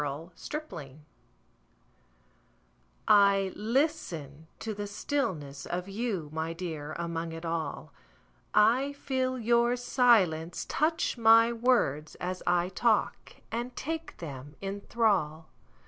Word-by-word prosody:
Listening 155 - -7 2.0
I 200 -2 +5
LISTEN 210 - -1
to 220 - -4
the 205 0 -5
stillness 190 - -3
of 180 +1 -3
you, 195 -7 -3
My 160 +1 -2
dear, 160 -4 -5
among 170 -1 -3
it 165 +1 -7
all;I 165 - -1
feel 260 -2 -1
your 235 +1 +3
silence 195 -10 +2
touch 320 -3 0
my 230 +1 +6
words 225 - +1
as 180 +1 -4
I 175 0 +2
talk, 220 +3 0 0.2
And 240 +2 -3
take 325 +2 -5
them 145 -2 -8
in 200 +1 -4
thrall. 180 -9 +1
195 Hz, 100 wpm, -29 LUFS, 160-235 Hz, 2.0 s, my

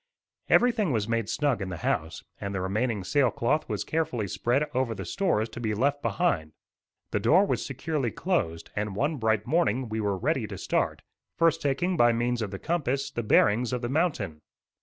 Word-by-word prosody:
Everything 225 -8 +4
was 110 -4 0
made 115 -2 -1
snug 140 -6 0
in 95 - -3
the 90 - -5
house, 80 +1 -1 0.2
and 100 0 -4
the - - -1
remaining 105 +2 -1
sail 135 +5 +3
cloth 135 +8 0
was - - -2
carefully 130 -10 -1
spread 125 +10 0
over 125 -3 0
the 95 -2 -6
stores 110 - 0
to - - -8
be 110 -3 -1
left 140 +5 +1
behind. 80 - 0 0.6
The - - +1
door 185 +6 +5
was - - -1
securely 135 -1 -2
closed, 100 - -2
and 105 -1 -2
one 145 +8 0
bright 110 -3 +1
morning 130 -5 +1
we 110 0 -2
were 100 -2 0
ready - - 0
to - - -7
start, - - -1 0.3
first 165 -1 +3
taking, 170 +6 0
by 120 -3 +5
means 120 +1 0
of 110 - -2
the 95 - -5
compass, 140 - -1
the 120 - -2
bearings 110 +2 +3
of 125 -1 -2
the 120 - -1
mountain. 130 - -1
120 Hz, 195 wpm, -27 LUFS, 105-150 Hz, 0.6 s, door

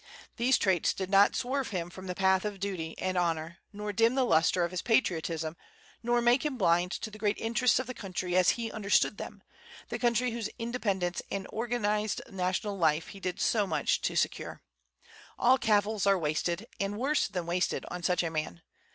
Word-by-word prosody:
These 245 +2 +3
traits 185 -4 +2
did 190 0 -4
not 200 +1 +5
swerve 265 +1 -1
him 175 -3 -4
from 185 +2 -9
the 180 - -3
path 190 0 +3
of 205 -2 -4
duty 180 -5 -4
and 185 -1 -1
honor, 165 -1 -2
nor 210 0 -5
dim 230 +5 +3
the 265 - +3
lustre 170 -2 +3
of 170 - -1
his 185 - -3
patriotism, 165 -8 0 0.5
nor 240 +1 +1
make 240 +2 +4
him 295 -4 -2
blind 175 -2 +2
to 220 - -5
the 215 - -11
great 210 -1 0
interests 235 +1 +2
of 260 - -1
the 255 - -6
country 185 -5 -4
as 185 -1 +5
he 230 -1 -3
understood 205 -1 +1
them, - - -8 0.5
the - - -3
country 240 0 +2
whose 225 -2 -3
independence 200 -7 -2
and 195 -1 -3
organized 215 -2 -1
national 190 +2 -2
life 160 -1 +2
he 200 - -10
did 180 -2 -4
so 210 -3 +2
much - - 0
to - - -1
secure. - - -2 0.7
All 255 +2 +4
cavils 210 -1 +2
are 195 -1 +5
wasted, 170 +4 -1
and 200 +1 -2
worse 285 +5 +1
than 180 -3 -4
wasted, 175 +1 -1
on 180 - -5
such 180 0 +1
a 165 - -2
man. 155 - -4
195 Hz, 195 wpm, -30 LUFS, 180-230 Hz, 0.7 s, not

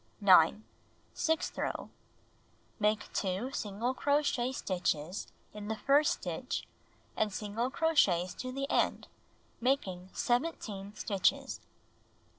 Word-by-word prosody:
9. 195 0 +6 0.5
Sixth 320 0 0
row: - - -3 0.9
Make 210 0 +1
2 195 +7 -1
single 220 +3 -2
crochet 280 -3 +1
stitches 180 - -2 0.3
in 210 0 -7
the 220 - -1
first 285 +6 +4
stitch - - -4 0.5
and 215 -1 +1
single 210 +5 -2
crochets 205 - +2
to 255 - -5
the 275 +1 -3
end, - - +1 0.5
making 190 -8 0
17 220 -7 -1
stitches. 200 -4 0
215 Hz, 100 wpm, -32 LUFS, 195-265 Hz, 0.9 s, 9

